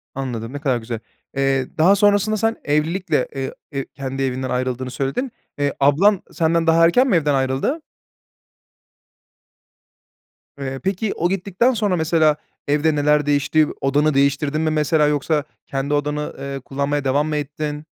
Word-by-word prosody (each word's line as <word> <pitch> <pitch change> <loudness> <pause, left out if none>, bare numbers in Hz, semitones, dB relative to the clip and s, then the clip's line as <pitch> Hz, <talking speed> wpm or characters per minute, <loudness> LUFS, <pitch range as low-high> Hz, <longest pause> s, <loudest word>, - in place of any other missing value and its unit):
Anladım. 125 -2 -4
Ne 145 - -4
kadar 130 -5 +1
güzel. 115 -1 -5 0.4
Eee, 135 -1 +1
daha 175 +5 +5
sonrasında 205 +1 +3
sen 225 +1 +1
evlilikle, 150 0 0
eee, 135 -1 -3 0.2
eee, 135 -1 -3
kendi 135 -1 -5
evinden 130 0 -2
ayrıldığını 130 0 -2
söyledin. 140 - -2 0.3
Eee, 145 -1 +1
ablan 175 +9 +4
senden 165 0 +1
daha 165 +1 +5
erken 250 +11 +4
mi - - +3
evden 150 -3 +2
ayrıldı? 135 - 0 2.8
Eee, 135 -1 -4
peki, 195 +2 -1
o 175 +2 0
gittikten 195 +6 +1
sonra 205 -4 0
mesela, 160 -2 +3 0.3
evde 150 +2 +2
neler 150 0 +2
değişti? 145 +1 +2
Odanı 145 +3 +2
değiştirdin 140 +2 +1
mi, 160 - +1
mesela, 155 0 +2
yoksa 150 +1 0 0.2
kendi 140 +2 -2
odanı, 150 +1 -1
ııı, 140 -1 -5
kullanmaya 140 +2 -2
devam 145 +3 +2
mı 155 - -2
ettin? 150 +1 -4
150 Hz, 145 wpm, -21 LUFS, 135-165 Hz, 2.8 s, daha